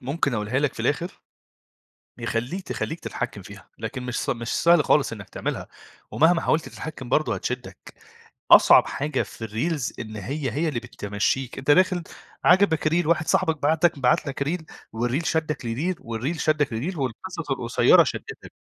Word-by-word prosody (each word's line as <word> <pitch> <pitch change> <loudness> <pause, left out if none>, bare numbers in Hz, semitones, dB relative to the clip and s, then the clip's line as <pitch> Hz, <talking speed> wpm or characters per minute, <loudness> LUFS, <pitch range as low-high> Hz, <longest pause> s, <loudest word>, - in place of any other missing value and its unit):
ممكن 140 0 -1
أقولها 110 +4 -1
لك 145 -1 0
في - - -7
الآخر 170 +5 -2 1.0
يخلّيك 120 +10 -3
تخلّيك 160 - -3
تتحكّم - - -5
فيها، - - -13
لكن 125 - -5
مش 125 -1 -3
س - - -5
مش 115 0 -3
سهل 170 -3 +5
خالص 140 -5 +3
إنك 100 -3 -8
تعملها - - -4 0.4
ومهما 165 +2 +4
حاولت 160 +1 0
تتحكّم 150 -6 -8
برضه 155 +5 +1
هتشدّك، 125 0 -6 0.6
أصعب - - +8
حاجة 150 +2 -1
في 115 - -8
الreels 125 +4 -2
إن 110 -2 -6
هي 135 +7 -3
هي 160 +3 0
اللي 125 -6 -2
بتمشّيك، 115 +2 -2
أنت 135 +2 -1
داخل 185 +2 +4 0.4
عجَبَك 175 -4 +4
reel 170 +1 +1
واحد 160 -2 +2
صاحبك 160 -3 +1
بعت 155 +3 +1
لك 160 -4 +4
بعت 125 +1 +2
لك 140 0 -2
reel، 160 +3 -2 0.3
والreel 120 +7 -1
شدّك 160 -3 -1
لreel 155 +11 -2
والreel 115 +9 -3
شدّك 150 -2 +2
لreel 140 +10 -4
والقصص 140 +5 -4
القصيرة 120 -3 +4
شدّتك. - - -6
145 Hz, 165 wpm, -24 LUFS, 120-160 Hz, 1.0 s, أصعب